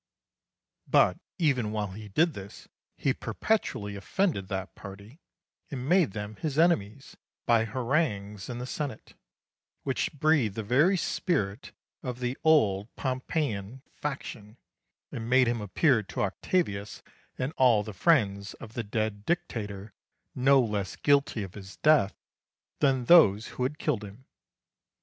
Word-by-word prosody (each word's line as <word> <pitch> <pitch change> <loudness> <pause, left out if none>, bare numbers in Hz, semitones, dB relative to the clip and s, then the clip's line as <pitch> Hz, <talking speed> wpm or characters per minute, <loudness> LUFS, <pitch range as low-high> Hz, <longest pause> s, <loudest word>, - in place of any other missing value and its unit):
But - - +4 0.2
even 130 - +1
while 105 -2 -2
he 105 +2 -9
did 160 - +2
this 100 -3 -10 0.3
he - - +1
perpetually 105 - -2
offended 100 - -1
that 95 -1 -4
party 100 - -11 0.5
and 130 -3 -5
made 175 - +3
them 105 0 -6
his 150 -3 -3
enemies 140 - +1 0.3
by 115 -2 +3
harangues 115 - -1
in 120 - -4
the 125 - -5
Senate, 130 -3 -5 0.7
which 135 -2 -1
breathed 145 -8 +2
the 110 - -3
very 145 - +3
spirit 125 - -1 0.3
of 125 -2 -5
the 125 +1 -2
old 110 -11 +3
Pompeian 130 -3 -3
faction, 120 -6 -6 0.5
and 115 0 -5
made 130 0 +5
him 120 -1 0
appear 115 - +2
to 105 - -4
Octavius 100 - -2 0.3
and 130 +4 -2
all 120 -5 +4
the 110 0 -7
friends 100 - +2
of 110 - -11
the 120 - -2
dead 105 -1 -2
Dictator 105 - -3 0.4
no 135 +2 +4
less 105 -6 -1
guilty 140 -6 +2
of 95 -2 -8
his 100 -1 -10
death 150 -11 +4 0.6
than 135 -4 +2
those 110 - +6
who - - -8
had 135 +4 -1
killed 140 -9 -1
him. 105 +6 -11
120 Hz, 135 wpm, -28 LUFS, 105-145 Hz, 0.7 s, those